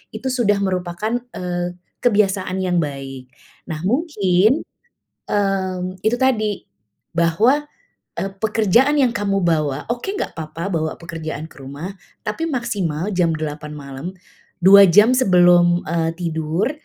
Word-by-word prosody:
itu 220 +5 -4
sudah 205 -5 +2
merupakan, 185 +4 -1 0.2
eee, 175 -1 -3 0.3
kebiasaan 195 -4 +1
yang 180 -1 0
baik. 135 -3 -7 0.4
Nah, 155 - -4
mungkin, 220 - +2 0.7
mmm, 190 -2 -1
itu 220 +2 +2
tadi, 215 -6 0 0.5
bahwa, 220 - +2 0.5
eee, 195 0 -2
pekerjaan 225 +6 +3
yang 250 -3 +3
kamu 200 -2 0
bawa 150 -4 0
oke 240 +7 -4
enggak 410 - -3
apa-apa 165 +4 -5
bawa 155 -1 0
pekerjaan 160 -2 -6
ke - - -16
rumah, 145 +8 -7 0.3
tapi 215 +10 -3
maksimal 195 - -2
jam 175 -3 +2
8:00 150 -1 -5
malam, 140 +1 -7 0.6
2 195 +1 +9
jam 210 +7 +6
sebelum, 175 -6 +4
eee, 165 0 0
tidur, 165 - -1
185 Hz, 125 wpm, -20 LUFS, 165-215 Hz, 0.7 s, 2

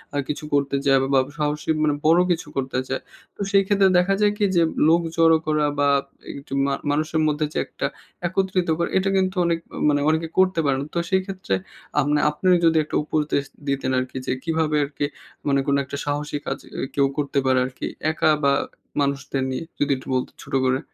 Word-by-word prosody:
আ - - 0
কিছু 150 - -4
করতে 140 -1 +1
চায় 135 -1 +5
বা 135 - 0
বা - - +6 0.2
সাহসী 150 +1 -2
মানে 150 -1 +3
বড়ো 165 +3 +6
কিছু 165 -3 -1
করতে 130 -1 -1
চায়; 130 - -2 0.3
তো - - -9
সেই 195 0 +5
ক্ষেত্রে 195 -2 +4
দেখা 180 +2 +3
যায় 210 0 +4
কি 205 - +2
যে, 170 - +5 0.2
লোক 165 +2 +5 0.2
জড়ো 165 -1 +6
করা 150 -1 +2
বা 145 0 +4 0.5
একটু 135 0 -10
মা 140 - 0 0.2
মানুষের 155 +2 0
মধ্যে 150 0 0
যে - - -3
একটা - - -3 0.4
একত্রিত 185 -1 0
করা; 170 - 0
এটা 190 +1 +1
কিন্তু 185 0 +1
অনেক 170 -1 +1 0.3
মানে 145 -1 +2
অনেকে 160 +1 +1
করতে 185 -2 +3
পারেনা। 135 0 +1
তো - - +2
সেই 190 0 +3
ক্ষেত্রে 190 - -2 0.4
আ - - +6
মানে 150 0 +3
আপনি 150 +5 -3 0.2
যদি 165 -1 +4
একটা 150 - -6
উপদেশ 150 -2 0 0.2
দিতেন 135 -1 0
আরকি 130 +1 -5
যে, - - -1
কীভাবে 160 -2 0
আরকি 145 0 -3 0.4
মানে 140 -1 +3
কোনো 140 - +3
একটা 140 +1 -6
সাহসী 145 0 -2
কাজ 135 - -2 0.2
এ - - -3 0.2
কেউ 140 -1 +4
করতে 145 -1 -1
পারে 130 -1 +3
আরকি 130 0 -6 0.3
একা 155 0 +2
বা 140 0 +4 0.5
মানুষদের 140 -1 -1
নিয়ে? 130 - -3 0.2
যদি 145 0 +1
একটু 130 - -13
বলতেন 130 0 -2
ছোট - - -13
করে। 130 0 +2
150 Hz, 205 wpm, -23 LUFS, 140-170 Hz, 0.5 s, বা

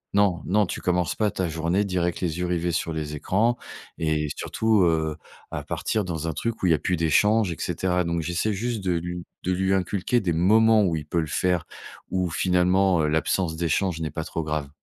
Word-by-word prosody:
Non, 100 -5 +3
non, 105 +3 +3
tu - - -5
commences 90 -1 +1
pas 105 -1 +1
ta 95 -2 -2
journée 85 +5 0
direct 90 -2 -1
avec - - -9
les 85 -1 -2
yeux 90 - -1
rivés 85 0 0
sur 85 0 -1
les 75 -1 -4
écrans» 110 +10 +1 0.4
et 80 -1 0
surtout, 110 -2 +1
heu, 80 -2 +1 0.4
à - - -4
partir 110 - -1
dans 85 -3 -4
un 80 - -1
truc 115 +6 -3
où - - +3
il 85 - +4
y - - +7
a 75 - +1
plus 90 +5 0
d'échanges 95 +6 +3
et - - -4
cetera, 90 -1 0
donc 85 0 -1
j'essaie 90 +6 -1
juste 110 +1 -3
de 90 -1 +1
lui 90 +1 -3 0.2
de 90 - 0
lui 95 +1 +1
inculquer 95 +5 0
des 90 -6 -1
moments 110 +6 +5
où 90 -4 +1
il 75 -2 -4
peut 85 +3 -1
le 80 - -4
faire, 90 +2 0 0.4
où 90 -2 -1
finalement, 90 +1 +3
heu, - - +2
l'absence 80 +2 0
d'échanges 85 +1 0
n'est 80 - -2
pas 80 0 -4
trop 80 - -4
grave. 75 -2 -3
90 Hz, 225 wpm, -25 LUFS, 80-95 Hz, 0.4 s, y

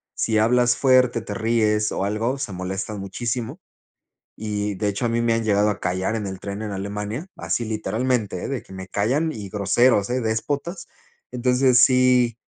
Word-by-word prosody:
si 110 -1 0
hablas 120 +2 +3
fuerte, 130 -3 +4
te 105 - -6
ríes 110 -1 +1
o 95 - -1
algo, 110 +3 -1
o 140 - -4
sea, 105 -8 -4
molesta 95 +3 -4
muchísimo. 120 - -4 0.8
Y 105 -1 -3
de 105 +2 -1
hecho, 100 +4 -1
a - - +1
mí 115 0 0
me 115 -1 +2
han 115 - -1
llegado 105 0 +3
a 105 - -3
callar 95 +5 -1
en 105 -2 -3
el 95 -1 -6
tren, 100 +1 -5
en 105 - -4
Alemania, 105 - -4
así, 120 - -2
literalmente, 110 -2 -1
eh, - - -4
de 135 -3 -4
que - - -15
me 95 0 -8
callan 135 - 0
y 105 -7 -7
groseros, 105 +2 +2
eh, 125 +1 0
déspotas. 145 +10 -3 0.4
Entonces 125 0 +3
sí 125 -2 +3
110 Hz, 185 wpm, -23 LUFS, 100-125 Hz, 0.8 s, fuerte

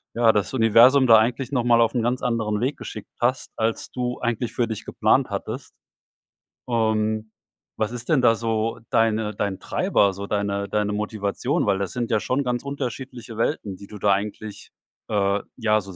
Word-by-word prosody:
ja, 115 -1 +5
das 105 +3 -1
Universum 125 +3 +6
da 115 -1 +9
eigentlich 120 +4 0
noch 125 -3 +1
mal 120 -1 +4
auf 115 +1 +2
'n 120 - +2
ganz 125 +2 0
anderen 110 -3 0
Weg 135 +4 -1
geschickt 110 - -8
hast, 125 +2 0
als 110 0 -2
du 125 0 -3
eigentlich 120 -1 -2
für 120 -2 0
dich 110 -2 -5
geplant - - +2
hattest. - - -5 0.9
Und 110 -2 0 0.5
was 110 +2 -1
ist 120 0 -7
denn 150 -5 +4
da 115 -1 +5
so 115 0 -2
deine 110 -2 +1
dein 100 -2 -2
Treiber, 100 -1 +2
so 100 +2 -6
deine 100 -1 -1
deine 105 -1 0
Motivation? 105 -1 -1
Weil 100 -1 +2
das 95 -3 -3
sind 120 -1 -3
ja 110 -2 +2
schon 130 +6 0
ganz 125 +1 -2
unterschiedliche 130 -4 -6
Welten, 105 -7 -1
die 100 - -12
du 105 - -10
da 100 0 +3
eigentlich 105 +1 -4 0.4
äh, 100 -1 +1 0.2
ja, 110 -2 +2
so 95 0 -11
110 Hz, 185 wpm, -23 LUFS, 105-120 Hz, 0.9 s, da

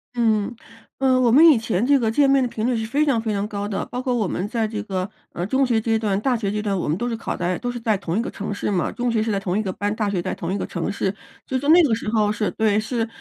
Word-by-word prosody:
嗯， 225 0 +1 0.4
呃， 260 -1 +3
我 240 -2 +3
们 305 +7 +7
以 295 -7 +7
前 225 -1 -1
这 280 0 +4
个 225 -2 +1
见 275 +4 +3
面 275 -1 +4
的 250 - +1
频 220 0 -3
率 250 - +1
是 225 -1 -2
非 290 +6 +1
常 245 -6 +2
非 220 -1 -2
常 200 0 -1
高 205 -1 -4
的， 200 -2 -3
包 250 - -5
括 255 -2 -1
我 215 -5 0
们 185 +4 -2
在 230 -3 0
这 210 -1 -4
个， 190 -2 -3 0.2
嗯， 175 +2 -3
中 265 +3 +2
学 235 -3 +2
阶 225 0 0
段、 205 -3 0
大 250 +2 +1
学 210 -4 -2
阶 210 - -2
段， 205 -2 -1
我 175 - -2
们 155 +4 0
都 240 - -2
是 230 - -2
考 225 - -4
在 180 0 -1
都 245 0 -3
是 240 - -6
在 220 -2 +1
同 180 0 -3
一 - - +2
个 - - -4
城 205 0 -5
市 205 - -2
嘛， 180 -3 0
中 245 -1 -1
学 220 -2 +1
是 220 0 -1
在 200 - 0
同 190 0 -2
一 - - +1
个 190 -3 -3
班， 205 +2 -2
大 210 -2 -1
学 185 -3 -1
在 - - -3
同 170 +2 -4
一 - - -1
个 - - -3
城 - - -3
市。 195 -1 -1 0.3
所 260 - -4
以 - - -4
说 285 - -1
那 340 +1 +8
个 250 -7 +2
时 220 -1 -2
候 215 -2 +2
是 210 0 -1
对， 215 -1 +1
是， 225 +1 -2
220 Hz, 350 characters per minute, -22 LUFS, 205-245 Hz, 0.4 s, 那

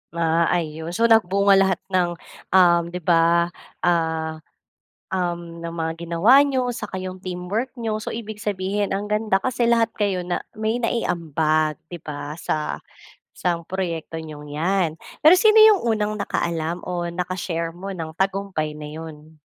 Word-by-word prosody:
Ah, 165 0 +2
ayun, 160 +1 -3
so, 230 - +1
nagbunga 200 -3 +5
lahat 190 -2 +2
ng, 175 -2 +1 0.4
uhm, 170 -2 +6
di 180 - -5
ba, 170 +1 +3 0.3
ah, 160 -2 0 0.8
uhm, 170 -2 -3
ng 170 - -4
mga 160 -1 -2
ginawa 210 +12 +6
niyo, 260 -3 0
saka 210 -4 -5
yung 185 0 -6
teamwork 185 +7 -3
niyo. 220 -2 -2
So, - - -4
ibig 220 -1 -7
sabihin 200 0 -1
ang 205 +1 -2
ganda 210 -2 +2
kasi 240 -2 +1
lahat 230 -1 +3
kayo 195 -4 0
na 180 - -2 0.2
may 220 +2 0
naiambag, 155 -8 0
di 175 - -6
ba? 150 0 -6
Sa 155 -1 -2 0.6
isang 170 -2 -2
proyekto 170 -4 -3
niyong 150 -2 -9
yan. 180 +1 +1 0.3
Pero 325 +4 +9
sino 435 +3 +6
yung 435 -3 +7
unang 210 0 -1
nakaalam 170 -3 -2
o 175 -1 -2
naka-share 170 -2 -3
mo 195 +2 -6
ng 165 -3 -6
tagumpay 190 -6 -1
na 150 0 -7
yun? 155 0 -10
180 Hz, 150 wpm, -23 LUFS, 165-205 Hz, 0.8 s, Pero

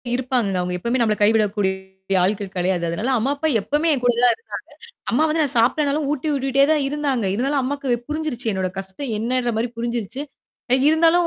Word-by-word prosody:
இருப்பாங்கங்க. 245 -6 0
அவங்க 180 0 -3
எப்பவுமே 235 +7 -1
நம்மளை 215 -2 +2
கைவிடக்கூடிய 195 -3 0
ஆட்கள் 195 0 -1
கிடையாது. 180 -1 0
அதனால, 210 +10 -2
அம்மா 245 +5 0
அப்பா 315 +3 -1
எப்பவுமே 300 +9 0
என்கூட 245 -3 +2
தான் 240 - 0 0.7
இருந்தாங்க. 485 - -24
அம்மா 285 +7 +3
வந்து 315 +1 +1
நான் 280 - -2
சாப்டேனாலும், 285 +5 +2
ஊட்டி 300 +1 -2
விட்டுட்டே 275 0 +2
தான் 300 - +2
இருந்தாங்க. 280 -5 -1
இருந்தாலும் 270 +6 0
அம்மாக்கு 265 -2 -1
புரிஞ்சிருச்சு 300 -6 -2
என்னோட 190 -1 -1
கஷ்டம் 195 +7 -5
என்னன்ற 245 +2 0
மாரி 230 +2 0
புரிஞ்சிருச்சு. 235 +2 -3 0.5
அ - - +7 0.2
இருந்தாலும். 335 +2 +4
245 Hz, 170 wpm, -21 LUFS, 205-285 Hz, 0.7 s, அ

